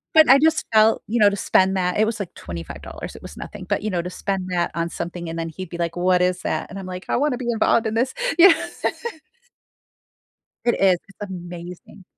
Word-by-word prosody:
But 315 -4 +7
I 270 +1 +8
just 320 +1 +3
felt, 220 +1 +5
you 235 +3 0
know, 205 -1 +7
to 200 - -3
spend 190 -1 +2
that 180 +2 0
it 215 - +5
was 225 -1 -3
like 185 - -6
$25, 85 -2 -8
it - - -14
was - - -10
nothing, - - -8
but - - 0
you 215 - -1
know, 180 -3 -1
to 180 - -5
spend 190 0 -3
that 175 -1 0
on 170 0 0
something 175 0 -5
and 165 - -5
then 165 0 -3
he'd 185 +3 -7
be 170 - -6
like, 170 0 -2
"What 180 0 +3
is 180 0 +1
that?" - - -2
and 195 - -7
I'm 190 - -7
like, 180 0 -7
"I - - +2
want 290 0 +1
to - - -3
be 240 -1 -1
involved 225 0 +2
in 220 - -2
this." 250 +3 +1 0.3
You 365 - +11
know? 330 - +2 2.0
It 240 - +3
is, 185 -2 +5
it's 195 0 -9
amazing. 175 +1 -9
185 Hz, 235 wpm, -22 LUFS, 175-220 Hz, 2.0 s, You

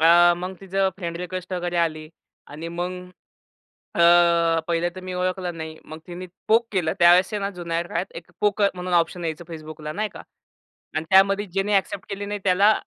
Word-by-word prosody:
अ, 175 +2 +7
मग 185 +2 -5
तिचं 195 0 0
friend 170 -3 -4
request 180 +1 -6
वगैरे 175 -1 -2
आली. 155 -2 -1 0.4
आणि 155 +3 -7
मग 175 +2 -3 1.1
अ, 170 -1 +5
पहिलं 170 0 +1
तर 185 - -7
मी 185 0 -6
ओळखलं 180 -1 -2
नाही. 160 0 -6
मग 155 +1 -8
तिने 180 +1 -7 0.2
पोक 230 +1 +4
केलं. 175 -5 0
त्यावेळेस 175 +4 +6
ना 200 -1 -1
जुन्या 170 -3 -3
काळात 185 - -2
एक 170 +1 -10
पोक 210 0 +2
म्हणून 180 0 -4
ऑप्शन 170 +1 +1
यायचं 160 +1 -4
Facebookला 155 -1 -7
नाही 215 +1 -1
का. - - -9 0.7
आणि 155 +1 -1
त्यामध्ये 195 +2 +5
ज्यांनी 195 +2 -1
एक्सेप्ट 195 -1 0
केली 200 0 -4
नाही 205 0 -4
त्याला 200 +3 +5
175 Hz, 175 wpm, -24 LUFS, 170-190 Hz, 1.1 s, अ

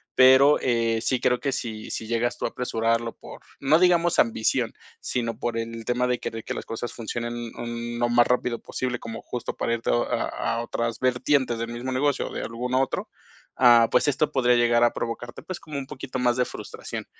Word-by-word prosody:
pero, 130 +3 +7
eh, 115 -2 +1
sí 125 +1 0
creo 125 -1 +1
que 140 - 0
si 110 -4 -5
si 110 - -4
llegas 120 +1 0
tú - - -3
a - - 0
apresurarlo 115 -1 -1
por, - - -11 0.2
no 145 +3 +4
digamos 175 -1 +3
ambición, 110 -1 +2 0.3
sino 115 -3 -2
por 120 -1 -2
el 115 0 -4
tema 125 +2 0
de 125 -1 0
querer 115 -1 -5
que - - -3
las - - -6
cosas 115 +1 -5
funcionen, 120 0 -4
mm, 120 0 -5
lo 120 - +2
más 120 0 +4
rápido 125 -1 0
posible, 125 -1 -3
como 115 0 -7
justo 125 - -5
para 115 - 0
irte 115 - -2
a - - +4 0.6
a 115 - -1
otras 115 -1 -3
vertientes 130 -1 +1
del 115 - -2
mismo 125 +2 -4
negocio 140 +2 +1
o - - -10
de - - -3
algún 125 +2 -4
otro, 130 0 0 0.5
ah, 120 -2 +7
pues 125 - +3
esto 145 +1 +1
podría 125 -2 +3
llegar 120 0 +4
a 120 - +4
provocarte, 120 +1 -5
pues, 185 - -6
como 150 -3 -7
un 135 - -4
poquito 130 -2 -6
más 120 0 +2
de 125 - +2
frustración. - - -7
120 Hz, 205 wpm, -25 LUFS, 115-130 Hz, 0.6 s, pero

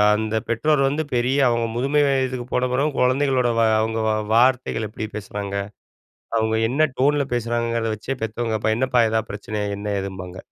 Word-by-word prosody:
அந்த 110 0 -2
பெற்றோர் 135 +5 +2
வந்து, 155 +3 -1
பெரிய 125 +4 +1
அவுங்க 115 -1 +1
முதுமை 140 +5 +2
வயதுக்கு 130 -2 0
போன 125 0 +1
பிறகும் 140 +2 0
குழந்தைகளோட 130 -1 +2
வ - - +4 0.2
அவங்க 110 +1 -1
வ 110 - +3 0.2
வார்த்தைகள் 120 -2 +2
எப்படி 110 0 -5
பேசுறாங்க, 100 -1 -5 0.8
அவங்க 110 0 +1 0.2
என்ன 155 +4 +2
டோன்ல 145 +1 +3
பேசுறாங்கங்கிறத 115 -1 -1
வச்சே 135 +6 -4
பெத்தவங்க, 110 0 -2
பா 110 - +3
என்னப்பா, 125 -2 +3
எதா 110 0 +1
பிரச்சனையா? 105 0 -4
என்ன, 105 - -7 0.2
ஏதும்பாங்க! 95 -2 -7
120 Hz, 160 wpm, -22 LUFS, 110-130 Hz, 0.8 s, வ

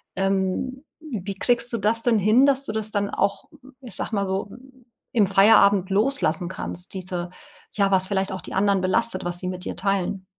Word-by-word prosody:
Ähm, 195 +8 -1 0.2
wie 210 - -6
kriegst 240 +1 +1
du - - +1
das 220 +2 +1
denn 235 -2 +3
hin, 215 +7 +4
dass 275 -1 +2
du - - -1
das 215 0 -3
dann 205 -1 -1
auch, 200 +1 -1 0.4
ich 245 -7 -7
sag - - -3
mal 200 -1 0
so, 190 +1 -3 0.6
im 215 -4 +3
Feierabend 200 -1 +5
loslassen 200 - +1
kannst, 180 0 -6
diese 180 -2 -4 0.4
ja, 200 -1 +2
was 190 -1 +3
vielleicht 195 -1 -1
auch 190 - -6
die - - -9
anderen 200 0 +2
belastet, 185 +1 0
was 175 0 -2
sie 180 - -5
mit 180 -1 -5
dir - - -5
teilen? 195 -1 -1
200 Hz, 190 wpm, -23 LUFS, 190-220 Hz, 0.6 s, Feierabend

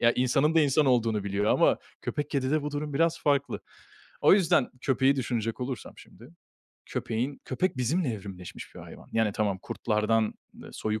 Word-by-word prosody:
Ya, 115 0 +5
insanın 135 +5 +2
da 165 - +6
insan 145 0 +3
olduğunu 115 -5 +2
biliyor 100 +1 -1
ama - - +4 0.2
köpek, 145 0 -3
kedide 140 +2 0
bu 150 - -3
durum 145 0 -4
biraz 165 +2 +2
farklı. 140 -1 +1 0.6
O - - +7
yüzden 175 -8 +3
köpeği 135 0 +3
düşünecek 115 -2 -2
olursam 125 -3 -5
şimdi, 120 +5 -15 0.6
köpeğin 125 +5 -3
köpek 140 +4 -1
bizimle 140 +6 0
evrimleşmiş 95 -4 -9
bir - - -9
hayvan. - - -12
Yani 110 -2 +2
tamam 100 -3 0
kurtlardan 110 0 0 0.3
ııı, - - -11
soyu 110 0 -2
130 Hz, 165 wpm, -28 LUFS, 110-145 Hz, 0.6 s, O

